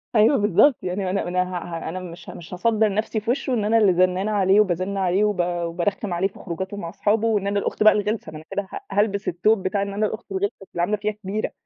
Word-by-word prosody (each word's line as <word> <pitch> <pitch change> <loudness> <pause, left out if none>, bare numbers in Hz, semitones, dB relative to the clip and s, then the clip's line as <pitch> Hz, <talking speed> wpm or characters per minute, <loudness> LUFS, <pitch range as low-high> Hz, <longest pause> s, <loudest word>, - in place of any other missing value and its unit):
أيوه 220 +6 +5
بالضبط، 210 - +4
يعني 185 +2 -2
ما 185 - -1
أنا 195 0 -1
أنا 180 +1 +1
ه 185 0 -5
ه 165 -2 -5
أنا 185 +3 -4
مش 175 -1 -10
مش 175 +1 -10
هاصدَّر 215 +2 +1
نفْسي 215 +2 -1
في 220 +3 -1
وشه 260 0 -1
إن 215 -4 0
أنا 225 +2 +3
اللي 205 -4 +5
زنانة 185 +3 +2
عليه، 195 -1 +4
وبازِنّ 190 0 +1
عليه، 190 +1 +2
وب 210 -3 0
وبارخِّم 175 +3 -2
عليه 175 +3 +1
في 195 - -16
خروجاتُه 190 +3 -5
مع 170 -4 -5
أصحابُه 210 +4 +1
وإن 205 -3 +1
أنا 200 0 +1
الأخت 205 - -1
بقى 215 - +8
الغلسة، 210 -4 -2
ما 155 - -8
أنا 155 - -12
كده 200 -1 -2
ه - - -5
هالبس 200 0 0
التوب 190 +4 +2
بتاع 195 +2 0
إن 200 0 -3
أنا 210 +2 0
الأخت 220 0 -5
الغلسة 195 +1 -1 0.2
اللي 170 - -2
عاملة 205 +5 +1
فيها 210 +1 -1
كبيرة، 210 0 -4
200 Hz, 250 wpm, -23 LUFS, 180-210 Hz, 0.2 s, بقى